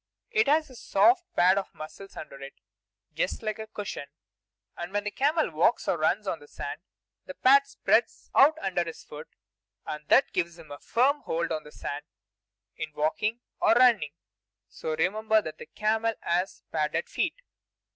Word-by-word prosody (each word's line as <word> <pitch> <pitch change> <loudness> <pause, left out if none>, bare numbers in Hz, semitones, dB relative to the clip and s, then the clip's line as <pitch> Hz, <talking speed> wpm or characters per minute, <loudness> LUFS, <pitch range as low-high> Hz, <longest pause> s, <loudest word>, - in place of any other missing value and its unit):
It 440 - +3
has 310 +2 +3
a - - -12
soft 355 - +3
pad 185 +3 +5
of 195 - -8
muscles 175 +6 -10
under 140 -3 -9
it, 135 0 -9 0.6
just - - -2
like 215 0 -3
a 220 - -6
cushion; 205 -9 -6 0.7
and 175 +1 -6
when 205 0 -1
the 210 - -3
camel 300 +7 +1
walks - - +2
or - - +2
runs - - +1
on - - -2
the 465 - -15
sand, - - -6 0.5
the 280 - -7
pad 275 +2 +5
spreads 225 -4 0
out 305 +3 +6
under 185 -3 +1
his 165 -1 -8
foot, 150 +1 -10 0.6
and 150 -1 -6
that 270 - +4
gives 170 -1 -1
him 160 -3 -14
a 145 - -7
firm 280 +5 +2
hold 170 +1 -2
on 155 -1 -3
the 150 - -12
sand 145 0 -6 0.7
in 155 - -5
walking 210 +10 0 0.2
or - - +5
running. 235 -12 +4 0.5
So 155 - -4
remember 215 +6 +2
that 155 -6 -7
the - - -9
camel 220 +1 0
has 180 +3 -1
padded 475 - -1
feet. - - -1
205 Hz, 175 wpm, -28 LUFS, 160-255 Hz, 0.7 s, out